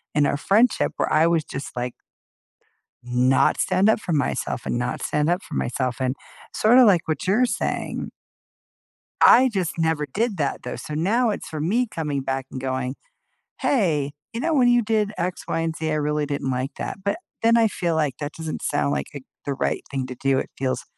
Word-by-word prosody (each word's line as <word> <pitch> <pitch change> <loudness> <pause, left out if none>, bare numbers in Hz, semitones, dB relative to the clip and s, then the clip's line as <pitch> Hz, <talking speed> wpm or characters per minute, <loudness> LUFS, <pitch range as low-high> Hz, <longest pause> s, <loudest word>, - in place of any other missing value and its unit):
in 150 -1 +4
our 140 - +1
friendship 220 +10 +2
where - - 0
I 155 +2 +5
was 165 -2 +2
just, 140 -1 -7
like 125 0 -3 1.1
not 125 +2 +2
stand 185 +2 +3
up 220 - +3
for 175 - -3
myself 145 -3 -1
and - - -1
not 125 +1 -2
stand 150 +2 +1
up 180 +3 0
for - - -9
myself, 125 0 -1
and, 130 +1 0 0.4
sorta 245 +4 +6
like 185 -6 +4
what 155 +2 -2
you're 220 +7 +3
saying - - -3 1.1
I 260 +1 +7
just 185 -5 -2
never 160 -2 +1
did 210 - -1
that, 145 -3 -2
though, 125 - -5
so 150 - -6
now 220 +9 +2
it's - - -5
for 155 -2 -5
me 225 +10 +1
coming 150 -6 -2
back 135 0 -2
and 130 - -6
going, 130 0 -2 0.7
"Hey, 155 - +1 0.2
you 230 - -4
know, 325 +4 0
when 250 -3 +4
you 240 -1 +4
did 215 -1 0
X, 175 +1 -3
Y 165 - -1
and 165 -1 -2
Z, 160 -1 -2
I 155 - 0
really 150 0 0
didn't 140 -2 -2
like 130 +2 -2
that," - - -4
but 200 - 0 0.3
then 230 +1 +5
I 225 -1 +4
feel 170 -4 -1
like 150 -5 0
that 145 0 -4
doesn't 160 -1 -5
sound 70 -1 0
like 70 -1 -1
it 140 - -7 0.2
the 140 -1 -2
right - - -1
thing 135 -2 -2
to 130 - -7
do, 135 0 +1
it - - -3
feels 130 -1 -1
155 Hz, 205 wpm, -23 LUFS, 135-200 Hz, 1.1 s, I